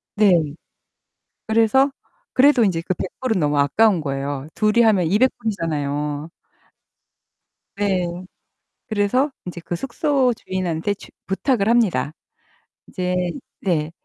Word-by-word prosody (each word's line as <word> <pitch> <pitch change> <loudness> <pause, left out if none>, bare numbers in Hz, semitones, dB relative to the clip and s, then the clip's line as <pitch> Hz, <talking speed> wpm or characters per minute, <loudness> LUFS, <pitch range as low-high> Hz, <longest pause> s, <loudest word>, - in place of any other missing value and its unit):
네. 210 -2 +5 1.2
그래서 230 +5 +3 0.4
그래도 260 -3 +5
인제 170 -4 0
그 185 - -2
100 185 - -4
불은 230 -7 0
너무 145 -1 +1
아까운 185 +6 +3
거예요. 140 0 -3
둘이 215 +2 +3
하면 200 -7 +3
200 215 +9 +3
불이잖아요. 150 -6 -2 1.5
네. 190 -4 +1 0.8
그래서 220 +7 +1 0.2
인제 170 -1 -7
그 175 - -3
숙소 270 - +1
주인한테 185 -1 -2
주 - - -14 0.2
부탁을 200 +2 0
합니다. 195 - +2 0.8
이제 180 -1 -1 0.3
네. 160 -4 0
190 Hz, 220 characters per minute, -21 LUFS, 160-225 Hz, 1.5 s, 네